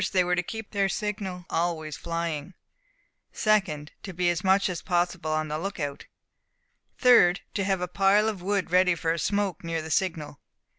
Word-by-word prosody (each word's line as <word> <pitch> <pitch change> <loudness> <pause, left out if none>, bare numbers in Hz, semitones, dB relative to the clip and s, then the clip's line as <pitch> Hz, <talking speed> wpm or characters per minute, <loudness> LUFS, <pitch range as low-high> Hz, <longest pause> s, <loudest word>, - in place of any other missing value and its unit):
They 185 -1 +4
were 180 0 0
to 180 - +1
keep 220 +4 -7
their 200 -2 +1
signal 195 -4 -4
always 165 -3 -2
flying. 165 0 -4 0.8
2d. 190 -9 +1
To 190 - -7
be 175 0 +2
as 170 - -3
much 190 +1 +3
as 180 -3 -4
possible 175 -2 -1
on 155 0 0
the 155 +1 -3
lookout. 160 -6 -4 0.9
3d. 230 -8 +6
To 200 - -1
have 190 -1 0
a 180 - -1
pile 195 +3 +3
of 210 -5 -3
wood 195 -1 -1
ready 180 -1 +4
for 165 0 -1
a 170 - -3
smoke 200 -1 -1
near 165 -1 -2
the 160 - -7
signal. 155 -5 -1
180 Hz, 180 wpm, -27 LUFS, 165-195 Hz, 0.9 s, 3d